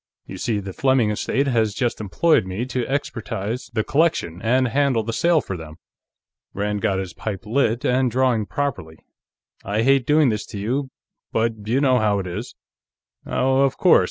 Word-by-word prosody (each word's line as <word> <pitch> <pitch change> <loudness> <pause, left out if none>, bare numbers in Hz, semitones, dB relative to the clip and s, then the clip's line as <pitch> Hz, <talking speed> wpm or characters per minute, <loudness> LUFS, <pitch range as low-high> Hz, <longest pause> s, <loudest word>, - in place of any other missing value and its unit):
You 95 - -9
see, 115 -2 -1
the 95 -1 -7
Fleming 130 -4 +2
estate 130 +6 0
has 115 -5 +1
just 120 -4 -1
employed 110 - +2
me 95 +6 -3
to 125 -1 -2
expertize 115 -4 -3
the 110 -2 0
collection 140 - 0
and 125 +3 +2
handle 130 -2 +1
the 115 +1 -4
sale 170 +4 +3
for 95 - -5
them." 80 -2 -9 0.8
Rand 105 0 -2
got 100 -4 +1
his 95 -3 -4
pipe 105 -2 -5
lit 115 0 0
and 130 0 +2
drawing 120 -3 +1
properly. 125 - -3 0.7
"I 105 +3 0
hate 135 -1 +3
doing 150 -2 +4
this 105 -1 -3
to - - -7
you, 130 +7 -2 0.4
but 110 -2 -1
you 120 +4 +2
know 130 -3 +3
how 105 -2 +2
it 95 - -3
is." 105 +7 -6 0.7
"Oh, 130 +1 +2
of 135 -1 +2
course. - - +6
115 Hz, 180 wpm, -22 LUFS, 105-130 Hz, 0.8 s, course